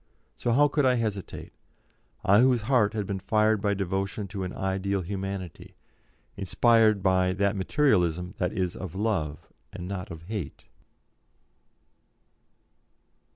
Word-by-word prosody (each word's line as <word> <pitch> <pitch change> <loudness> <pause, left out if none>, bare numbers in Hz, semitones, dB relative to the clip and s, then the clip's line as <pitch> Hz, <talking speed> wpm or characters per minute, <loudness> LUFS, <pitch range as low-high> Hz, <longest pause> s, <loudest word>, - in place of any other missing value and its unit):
So - - -3
how 140 +5 +5
could 145 0 0
I 130 -1 +4
hesitate 105 -5 -4 0.7
I 100 +2 +5
whose 125 -2 +3
heart 115 -4 +2
had 105 -2 -1
been 95 0 -3
fired 110 +1 +2
by 100 -1 +1
devotion 95 +2 -2
to 100 0 -5
an 90 - -4
ideal 95 0 -2
Humanity, 95 -2 -6 0.6
inspired 110 +1 +3
by 95 -1 +3
that 100 +2 0
Materialism 90 - +1
that 90 0 0
is 95 -4 -2
of 95 -2 -7
love 95 -8 -2 0.2
and 90 - -7
not 95 -1 -5
of 80 -1 -9
hate? 100 -4 -6
100 Hz, 130 wpm, -27 LUFS, 95-110 Hz, 0.7 s, how